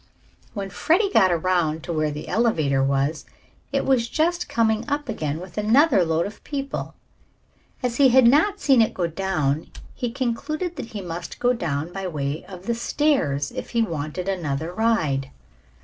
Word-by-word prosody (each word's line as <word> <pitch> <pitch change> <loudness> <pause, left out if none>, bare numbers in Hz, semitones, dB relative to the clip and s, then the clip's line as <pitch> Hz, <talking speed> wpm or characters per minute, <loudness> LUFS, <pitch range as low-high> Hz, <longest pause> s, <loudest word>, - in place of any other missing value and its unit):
When 195 -2 -4
Freddie 385 - +2
got 185 - +5
around 170 -2 +1
to 170 - -4
where 155 -1 +1
the 150 0 -6
elevator 155 - +2
was, 140 +3 0 0.5
it - - 0
was 245 -4 +2
just 340 +5 0
coming 220 -1 +1
up 290 0 -1
again 155 - -3
with 185 +3 -7
another 230 - +4
load 165 0 +1
of 205 +1 -9
people. 275 -1 -4 0.9
As 240 -1 -1
he 275 -2 +6
had 255 0 +6
not 325 - +4
seen 265 -5 +4
it 220 - +1
go 180 - 0
down 160 -4 -1 0.2
he 245 - -3
concluded 275 +8 -3
that - - -5
he 220 -3 -6
must 175 -1 -6
go 245 0 +2
down 160 -6 -3
by 195 0 -4
way 145 -2 -3
of 185 -1 -11
the 235 - 0
stairs 230 - 0
if - - -6
he 230 - +4
wanted 165 -1 -4
another 165 -3 -2
ride. 160 -12 +1
195 Hz, 170 wpm, -23 LUFS, 160-245 Hz, 0.9 s, he